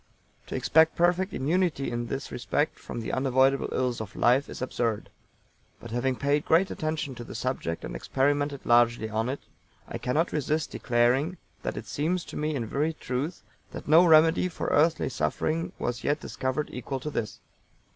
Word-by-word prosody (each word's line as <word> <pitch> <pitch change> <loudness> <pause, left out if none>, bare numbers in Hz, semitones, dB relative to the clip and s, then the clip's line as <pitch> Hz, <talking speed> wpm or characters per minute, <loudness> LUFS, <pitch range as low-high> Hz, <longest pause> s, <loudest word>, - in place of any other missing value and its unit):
To - - -5
expect 160 +1 +4
perfect 180 +3 +2
immunity 160 0 0
in 120 0 -3
this 135 +4 -4
respect 145 +5 -1
from 120 - -6
the 110 - -4
unavoidable 130 +1 +2
ills 125 -3 -1
of 105 -3 -8
life 130 +4 +3
is - - -7
absurd; 115 -4 -2 0.7
but 115 - -10
having 125 +2 0
paid 145 +3 +1
great 175 +4 +3
attention 155 -3 -3
to 120 - -8
the - - -9
subject, 115 -9 -3
and - - -6
experimented 145 +1 0
largely 120 -2 +3
on 110 +3 0
it, 135 - -4 0.5
I - - -5
cannot 155 +7 0
resist 155 +1 -1
declaring 125 +8 +1 0.2
that - - -4
it - - -5
seems 170 +4 -1
to - - -9
me 155 0 -1
in 120 -4 -2
very 150 +8 -1
truth 145 +3 -4 0.3
that - - -8
no 160 +4 +7
remedy 160 +1 +5
for 170 - -4
earthly 155 +2 +3
suffering 155 +5 -1
was 120 -1 -3
yet 145 +2 +1
discovered 130 +2 -3
equal 130 +2 -4
to 150 +4 -5
this. 110 -7 -3
140 Hz, 175 wpm, -27 LUFS, 120-155 Hz, 0.7 s, no